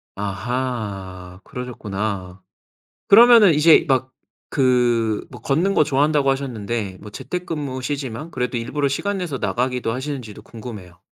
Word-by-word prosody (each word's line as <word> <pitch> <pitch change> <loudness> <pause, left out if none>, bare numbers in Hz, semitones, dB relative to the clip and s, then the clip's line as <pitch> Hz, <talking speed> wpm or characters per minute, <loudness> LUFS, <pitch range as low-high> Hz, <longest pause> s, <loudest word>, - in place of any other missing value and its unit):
아하, 100 -4 -4
그러셨구나. 100 -6 -5 0.7
그러면은 230 -3 +8
이제 150 +2 +6
막 130 -1 +1 0.4
그 120 -4 +2
뭐 - - -11
걷는 170 +8 +1
거 - - +4
좋아한다고 145 0 +2
하셨는데, 115 -7 -3
뭐 105 - -9
재택근무시지만 145 -4 -4
그래도 125 0 -2
일부러 140 +5 -1
시간 200 +9 -2
내서 165 -8 -3
나가기도 125 -1 -1
하시는지도 130 -4 -6
궁금해요. 105 -7 -10
125 Hz, 320 characters per minute, -21 LUFS, 110-145 Hz, 0.7 s, 그러면은